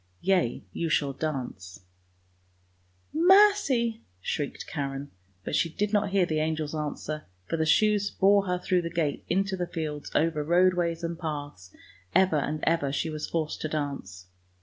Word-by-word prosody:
Yea, 175 - +1
you 170 - -2
shall 145 -3 +1
dance 125 - -5 0.5
" 90 0 -39
" 90 0 -39
Mercy! 330 - +4
" 90 - -39
shrieked 145 -3 -4
Karen, 140 -1 -4 0.3
but - - -2
she 165 - +2
did 205 +6 -2
not 205 -1 +2
hear 190 -2 +3
the 155 -2 -1
angel's 155 -1 -1
answer, 155 0 -4 0.2
for - - -2
the 160 -1 0
shoes 205 +4 +3
bore 200 0 +3
her 180 0 +1
through 180 0 +1
the 170 - -4
gate 160 -4 -1
into 195 +2 +1
the 180 -1 -3
fields 155 -4 -4
over 155 -1 +2
roadways 175 0 +2
and 170 0 -3
paths, 145 - -6 0.4
ever 190 -4 +4
and 150 +1 -2
ever 160 -4 +1
she 155 +3 -1
was 155 0 -4
forced 160 -2 -2
to - - -1
dance. 140 -12 -4
160 Hz, 170 wpm, -27 LUFS, 145-185 Hz, 0.5 s, Mercy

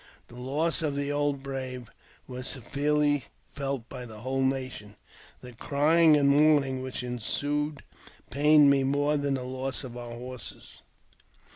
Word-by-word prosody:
The 120 - -13
loss 150 +7 0
of 150 -3 -1
the 140 0 -1
old 145 -1 -1
brave; 130 -3 -6 0.4
was 125 0 -5
severely 145 +2 0 0.3
felt 140 -4 -4
by 125 -2 -8
the 110 -2 -11
whole 135 +2 -1
nation. 130 -6 -2 0.5
The 125 -1 -11
crying 150 +5 +4
and 140 -1 +3
mourn 150 +1 +5
ing 130 -1 -4
which 130 -1 -4
ensued 145 +5 -2 0.5
pained 150 +1 +6
me 135 -1 +3
more 145 +2 +1
than 140 -1 0
the 130 - -4
loss 130 +2 -4
of 125 -2 -8
our 120 -1 -7
horses. 125 -2 -9
135 Hz, 150 wpm, -28 LUFS, 125-145 Hz, 0.5 s, pained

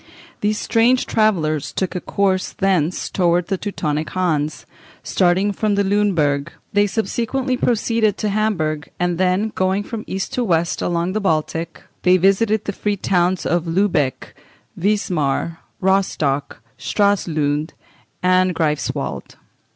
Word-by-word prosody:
These 210 +1 0
strange 240 +4 +2
travellers 165 -10 +1
took 190 -2 -2
a 180 - -2
course 190 -2 0
thence 185 -4 0
towards 175 -1 +1
the 195 - 0
Teutonic 155 -7 -2
Hanse, 155 -5 -1 0.4
starting 190 +2 +2
from 205 +1 0
Luneburg: 190 -8 +1 0.2
they 205 0 +4
subsequently 240 +5 -1
proceeded 225 -3 +1
to 215 - -1
Hamburg, 175 -8 -1
and 175 -1 0
then, 185 +4 +2
going 190 +2 0
from 220 0 -6
east 190 0 -4
to 250 - 0
west 170 -5 0
along 170 +1 0
the 215 - -1
Baltic, 165 -2 -1 0.2
they 180 +1 +5
visited 205 +3 +2
the 205 - -2
free 205 +1 -1
towns 180 -1 +1
of 170 0 0
Lubeck, 165 -6 0 0.4
Wismar, 170 -5 0 0.2
Rostock, 160 - 0 0.2
Stralsund, 155 - 0 0.5
and 185 0 +3
Greifswald. 150 -2 -2
185 Hz, 125 wpm, -20 LUFS, 165-205 Hz, 0.5 s, they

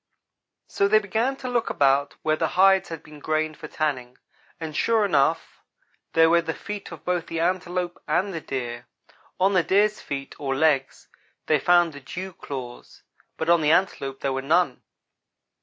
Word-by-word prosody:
So 200 - +1
they 215 +2 +5
began 220 +6 0
to 260 - -7
look 240 -2 0
about 140 0 +2
where 155 0 +2
the - - 0
hides 190 0 +5
had 165 -1 -7
been 150 -1 -13
grained 155 +1 -1
for 155 - -8
tanning; 130 -6 -3 0.4
and 160 -2 -6
sure 225 +2 +2
enough, 160 -2 +1 0.5
there 165 0 +6
were 170 +1 +4
the 165 -1 -4
feet 210 -3 -7
of 165 - -11
both 180 -1 -1
the 165 - -4
antelope 180 0 -1
and 180 +6 0
the 165 - -4
deer. 120 -4 -5 0.5
On 190 +2 +3
the 185 - +4
deer's 210 +4 +2
feet, 140 -1 -5
or 135 -2 -2
legs, 135 -2 +1 0.4
they 155 -2 +2
found 175 +1 +4
the 145 - -9
dew 180 +8 -7
claws, 130 -6 -9 0.3
but 160 - -3
on 170 -1 +5
the 150 - +2
antelope 140 -7 0
there 135 - -1
were 135 - -2
none. 155 -1 +1
165 Hz, 175 wpm, -24 LUFS, 140-185 Hz, 0.5 s, there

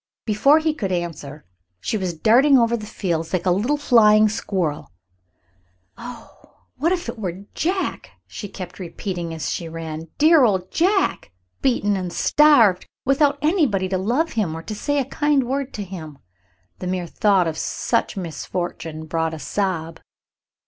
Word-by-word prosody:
Before 245 +8 +4
he 315 -1 +1
could 200 -11 -3
answer 155 -4 -4 0.3
she 160 - -2
was 185 -5 -2
darting 255 - +5
over 235 -1 +3
the 215 -2 -6
fields 170 -6 -3
like 185 -1 0
a 180 - +3
little 230 +11 +1
flying 215 -6 +5
squirrel. 180 -8 -3 1.0
"Oh, 240 -2 -12
what 335 +3 +1
if 360 -1 -1
it 230 - -6
were 190 -1 -5
Jack!" 370 +4 -2 0.2
she 205 - -8
kept 185 -1 -9
repeating 175 -1 -5
as 160 -1 -3
she 165 - -4
ran. 160 0 -6
"Dear 315 -1 +6
old 190 -5 +1
Jack, 380 - +1 0.3
beaten 220 -6 +1
and 185 -2 -3
starved, 235 - +4 0.2
without 280 +1 +3
anybody 295 - +2
to 185 -1 0
love 250 - 0
him 185 -8 -1
or 165 - -8
say 255 +7 -2
a 275 - +1
kind 295 0 +1
word 270 +2 -2
to 210 - -4
him." 165 -6 -9 0.6
The 180 - -5
mere 180 -1 -2
thought 190 +1 +2
of 160 - -2
such 230 +6 -1
misfortune 165 -2 -5
brought 160 0 -1
a - - -9
sob. 165 -3 -2
200 Hz, 155 wpm, -22 LUFS, 175-265 Hz, 1.0 s, Dear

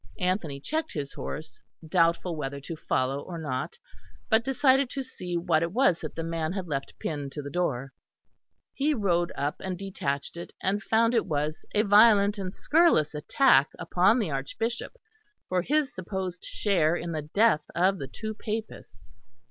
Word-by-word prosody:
Anthony 180 -6 -1
checked 315 - -3
his 140 -2 -4
horse, 155 - -7 0.3
doubtful 170 +1 +2
whether 140 -2 -4
to 150 +4 -6
follow 135 -2 -1
or 175 +3 -7
not, 155 - -4 0.5
but 220 -1 +4
decided 265 0 +3
to 270 0 -4
see 180 -9 -5
what 165 -2 +2
it 170 0 -1
was 210 -8 +3
that 155 - -6
the 165 - -3
man 165 0 -2
had 190 -2 -3
left 135 -3 -4
pinned 145 -3 -4
to 150 - -5
the 140 - -7
door. 135 -6 -1 0.8
He 295 +2 +1
rode 175 -6 +1
up 145 +1 -2
and 185 -1 -4
detached 170 -6 -3
it, 170 - -8
and 200 +2 0
found 230 +2 +2
it 230 - +2
was 150 +1 -2
a 210 - +4
violent 205 -1 +6
and 185 -2 -3
scurrilous 300 - +3
attack 150 - +4
upon 180 +7 +3
the 205 -10 -1
Archbishop 225 - -3 0.5
for 185 -1 +1
his 290 - +1
supposed 185 -1 -5
share 175 -6 +1
in 170 -1 -4
the 155 -2 -2
death 160 +3 +3
of 185 +2 +2
the 135 - -5
two 220 +10 -6
Papists. 215 - -6
180 Hz, 170 wpm, -27 LUFS, 155-215 Hz, 0.8 s, violent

